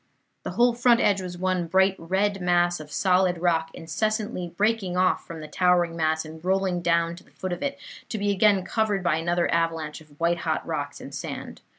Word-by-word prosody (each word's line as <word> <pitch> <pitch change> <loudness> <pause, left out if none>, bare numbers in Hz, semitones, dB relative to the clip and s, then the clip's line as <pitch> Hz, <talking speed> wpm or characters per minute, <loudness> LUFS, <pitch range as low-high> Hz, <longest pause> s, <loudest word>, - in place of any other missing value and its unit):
The - - -5
whole 240 +4 +4
front 240 0 +4
edge 195 -1 +2
was 180 -1 -6
one 185 -1 0
bright 190 +2 +3
red 195 +3 0
mass 175 -1 +2
of 150 -1 -10
solid 185 -1 +2
rock 165 -2 +1
incessantly 210 +3 -2
breaking 205 -4 +1
off 185 0 +2
from 165 -1 -7
the 155 - -7
towering 175 0 +2
mass 160 -1 0
and 160 +1 -11
rolling 190 -1 +1
down 170 0 +1
to - - -13
the - - -24
foot 185 -1 -5
of - - -6
it, 280 0 -2 0.3
to 220 - -3
be 205 0 0
again 200 -1 +3
covered 210 -4 0
by 160 -3 +2
another 170 +1 +1
avalanche 165 -2 -1
of 150 -2 -20
white 170 +1 +1
hot - - -2
rocks - - -4
and - - -9
sand. - - -6
180 Hz, 205 wpm, -25 LUFS, 165-195 Hz, 0.3 s, whole